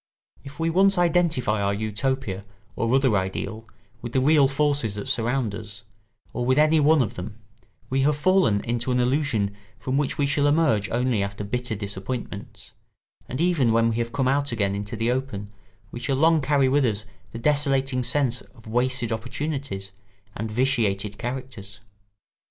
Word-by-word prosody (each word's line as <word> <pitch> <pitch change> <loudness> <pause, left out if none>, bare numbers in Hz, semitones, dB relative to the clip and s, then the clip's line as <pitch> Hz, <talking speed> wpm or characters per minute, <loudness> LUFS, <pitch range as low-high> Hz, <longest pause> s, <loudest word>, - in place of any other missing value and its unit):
If 140 +2 -11
we 165 0 +1
once 195 +3 +4
identify 165 -11 +2
our 100 0 +1
Utopia 110 -1 -2 0.3
or 115 0 0
other 130 -5 +3
ideal 100 +3 -3 0.3
with 120 0 -6
the 130 - +3
real 145 +1 +5
forces 140 -6 0
that 105 - -5
surround 120 -1 0
us, 105 0 -8 0.5
or 125 - -2
with 130 +2 +2
any 155 +1 +5
one 150 -1 +5
of 110 0 -4
them, 105 +2 -7 0.5
we 135 +1 0
have 145 +1 +2
fallen 180 - +3
into 120 +2 -2
an 125 - +2
illusion 125 -6 +1 0.2
from 130 +4 -1
which 145 - -1
we 145 - +2
shall 145 +1 +2
emerge 145 -9 +2
only 120 -2 +1
after 100 +1 -4
bitter 120 +2 -3
disappointments; 100 +2 -6 0.6
and 130 - -4
even 165 -9 +2
when 115 0 +3
we 110 - -2
have 115 0 -2
come 130 +1 0
out 140 +1 +1
again 100 -4 0
into 100 +2 -4
the 115 +2 0
open, 125 -6 -3 0.4
we 120 - -6
shall 135 +3 0
long 160 +2 +4
carry 140 0 +2
with 140 +2 +3
us 110 -3 0 0.3
the - - -7
desolating 135 -1 +1
sense 125 -2 0
of 115 -3 -19
wasted 120 +1 0
opportunities 125 -3 -4 0.4
and 110 +1 -4
vitiated 110 -5 0
characters. 120 -5 -6
125 Hz, 170 wpm, -24 LUFS, 110-140 Hz, 0.6 s, real